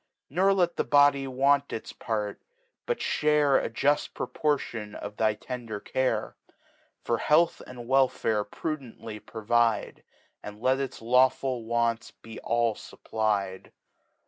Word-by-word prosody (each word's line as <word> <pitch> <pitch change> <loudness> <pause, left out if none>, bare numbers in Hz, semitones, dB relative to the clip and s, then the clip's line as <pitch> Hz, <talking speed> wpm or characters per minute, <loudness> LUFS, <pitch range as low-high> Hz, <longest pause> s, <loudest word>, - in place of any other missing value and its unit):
Nor 190 +6 +3
let 175 -3 +1
the - - +2
Body 145 -1 +4
want 140 +2 +2
its 110 - -6
Part, 105 -3 -3 0.5
but 480 - 0
fhare 150 -2 +2
A - - -2
jufl 145 +6 +1
Proportion 120 -8 -2
of 105 0 -7
thy 110 -1 +2
tender 115 -2 -6
Care: 130 +4 -1 0.7
Ifor 115 -1 0
Health 165 +3 +3
arid 125 -1 -9
Welfare 125 -5 +2
prudently 115 -3 -6
provide. 115 +1 0 0.4
And 105 0 -9
let 130 +3 +2
its 135 -4 -5
lawful 125 0 +2
Wants 115 0 0
be 115 -1 -12
all 115 -1 +1
fupply'd. 105 -4 -3
120 Hz, 125 wpm, -27 LUFS, 110-140 Hz, 0.7 s, Body